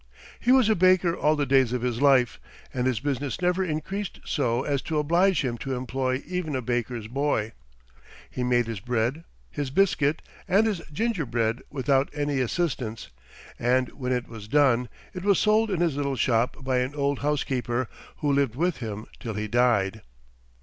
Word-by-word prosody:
He 245 - +2
was 260 -4 +6
a 220 - +5
baker 185 -2 +4
all 155 -2 +2
the 145 -1 0
days 130 -2 +3
of 125 -1 -2
his 125 0 -1
life, 135 -4 +4 0.3
and 125 0 0
his 125 -4 0
business 140 -1 -2
never 180 +1 +1
increased 185 +5 -4
so 125 -4 0
as 140 -2 0
to 160 - -3
oblige 170 +4 +3
him 120 -2 -3
to 135 +1 -3
employ 130 +1 -2
even 175 -4 -3
a 130 - -1
baker's 120 -1 -2
boy. 125 -3 0 0.8
He 125 - -4
made 120 -1 +2
his 115 -3 -5
bread, 125 +8 -1 0.3
his 145 -2 -3
biscuit, 155 -2 +2 0.2
and 200 +4 +4
his 205 -6 -1
gingerbread 135 - -1
without 135 0 +1
any 145 -2 0
assistance, 125 -5 -2 0.5
and 125 +1 +2
when 125 -2 -4
it 125 -1 -1
was 110 -3 -10
done, 125 -2 +3 0.2
it 180 - -6
was 200 -1 +4
sold 215 +1 +3
in 185 -4 -1
his 165 -5 +1
little 140 -1 -1
shop 120 +1 +1
by 130 -1 +1
an 130 +3 -2
old 140 -1 0
housekeeper, 130 -4 -1 0.3
who 145 -1 +2
lived 140 -4 +1
with 175 +3 0
him 110 -3 -5
till 115 -3 -5
he 105 +1 -2
died. 110 -3 +2
135 Hz, 175 wpm, -26 LUFS, 120-155 Hz, 0.8 s, was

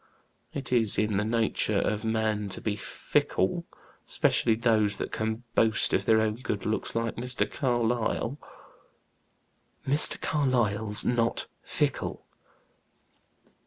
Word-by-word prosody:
It 135 -3 -4
is 115 -4 +3
in 105 -2 +1
the 105 - +1
nature 115 0 0
of 105 +1 -1
man 110 -2 -1
to - - -6
be 105 -2 -2
fickle, 105 - -1 0.4
specially 115 -2 +2
those 110 -3 +1
that - - -4
can 110 +2 -3
boast 110 -1 +2
of - - +1
their 110 -1 +4
own 110 0 -1
good 110 -5 -4
looks, 110 +1 -1
like 115 0 -2
Mr. 125 +2 -1
Carlyle." 120 +1 -1 1.5
"Mr. 145 +3 +5
Carlyle's 110 -8 +1
not 115 -1 +1 0.2
fickle." - - -2
110 Hz, 120 wpm, -27 LUFS, 110-120 Hz, 1.5 s, Mr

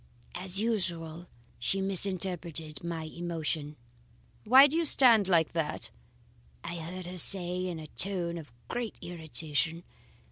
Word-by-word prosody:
As 185 +1 -1
usual 175 -7 -2 0.3
she 190 +11 0
misinterpreted 180 -5 -1
my 170 -2 -4
emotion. 160 -2 -4 0.7
"'Why 260 +4 +9
do 290 +2 0
you 335 - +2
stand 240 - +5
like 165 -4 +3
that?' 160 -2 -2 0.7
I 175 - -5
heard 175 +3 -6
her 180 +1 -5
say 180 +1 +5
in 175 -2 -4
a 155 - -8
tone 170 0 -2
of 150 -6 -12 0.2
great 240 - -4
irritation. 160 -1 -3
175 Hz, 130 wpm, -30 LUFS, 160-190 Hz, 0.7 s, Why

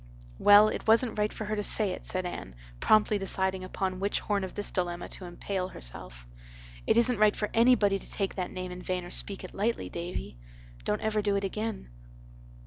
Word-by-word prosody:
"Well, 205 +1 +7
it - - -5
wasn't 225 0 +3
right 210 0 +1
for 215 - -6
her 215 +1 -2
to 210 - -2
say 205 -1 +4
it," - - -7
said 185 0 -1
Anne, 175 - -6 0.2
promptly 215 - +3
deciding 190 -1 0
upon 185 0 -3
which 200 +1 0
horn 205 -2 -1
of 190 - -6
this 205 - -3
dilemma 175 -2 -2
to 185 - -8
empale 185 +1 -4
herself. - - -10 0.6
"It - - +3
isn't 235 -1 +3
right 215 -1 +4
for 210 - -3
anybody 225 -4 +4
to - - -11
take 195 -2 -1
that 185 -2 -3
name 185 0 -6
in 180 0 -8
vain 180 -1 -3
or 175 - -10
speak 200 -1 +1
it 185 - -8
lightly, 225 +4 -1
Davy. 170 - -6 0.5
Don't 105 - -1
ever 215 -1 0
do 205 -1 0
it 200 - -1
again." 210 - -4
195 Hz, 205 wpm, -29 LUFS, 185-215 Hz, 0.6 s, Well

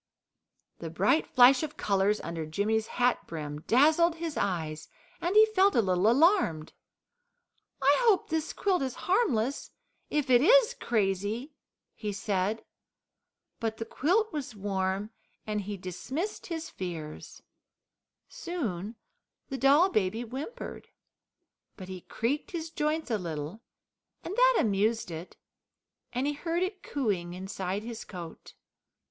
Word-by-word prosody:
The 165 - -5
bright 200 - +2
flash 255 0 +6
of 305 -2 -5
colours 200 +1 +1
under 165 -1 -4
Jimmy's 215 +7 0
hat 245 0 0
brim 150 -2 -6
dazzled 315 +7 +4
his 330 -2 -4
eyes, 160 -5 -2 0.3
and 350 +4 -1
he 430 +1 +9
felt 400 -2 +3
a 235 - +5
little 185 +2 +3
alarmed. 270 - +3 1.1
"I 280 +2 +6
hope 405 -5 +4
this 320 0 -1
quilt 380 -5 0
is 260 -2 -2
harmless 285 - +1 0.4
if 290 -3 0
it 245 -1 +7
IS 480 - +6
crazy," 210 - -1 0.4
he 210 -2 -4
said. 200 +1 -1 0.9
But 220 -1 -2
the 225 - -4
quilt 395 - +1
was 280 -7 -4
warm, 195 +1 -2 0.3
and 210 -1 -2
he 205 +1 -5
dismissed 260 - -5
his 330 -2 -4
fears. 165 -5 -7 0.8
Soon 225 - -4 0.5
the 270 - -3
doll 290 +7 +5
baby 215 - 0
whimpered, 265 - -7 0.9
but 185 -2 -9
he 185 -1 -7
creaked 275 - -2
his 330 -4 -5
joints 305 -3 -1
a 220 - +1
little, 165 +3 -5 0.6
and 385 - -5
that - - +5
amused 215 -1 +1
it, 165 +2 -8 0.7
and 250 +2 -1
he 295 - 0
heard 335 +4 -1
it 375 0 -4
cooing 190 -11 -2
inside 190 +1 -4
his 230 -1 -6
coat. 170 -4 -10
230 Hz, 130 wpm, -29 LUFS, 190-315 Hz, 1.1 s, he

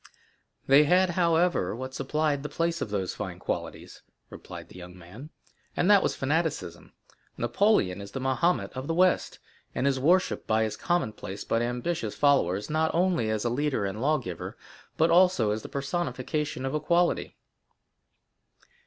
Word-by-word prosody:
"They 140 +3 +6
had, 180 +3 +3
however, 170 - +1
what 130 +2 -6
supplied 145 +1 -1
the 150 - -5
place 165 +3 -1
of - - -3
those 95 -3 -2
fine - - -6
qualities," - - -5 0.3
replied - - -10
the - - -13
young 90 0 -11
man, 100 - -12 0.5
"and 185 - +3
that 200 -2 +7
was - - -1
fanaticism. 135 - -2 0.4
Napoleon 120 - +1
is 100 - -8
the 135 - -5
Mahomet 135 +7 0
of 130 +2 -6
the 165 - -1
West, 185 +1 +2 0.4
and 125 - -1
is 135 -1 +1
worshipped 175 +7 +2
by 110 0 +2
his 110 - -2
commonplace 110 - -2
but 115 - 0
ambitious 120 0 -2
followers, 105 -10 +2
not 160 +1 +1
only 175 -10 +1
as 110 +1 -1
a - - +2
leader 140 -4 0
and 100 +3 -4
lawgiver, 135 - -2 0.4
but 160 +1 +3
also 175 - +4
as 110 +1 -2
the - - -9
personification 140 -1 -3
of 135 - -2
equality." 170 +3 +1
140 Hz, 155 wpm, -27 LUFS, 110-170 Hz, 0.5 s, that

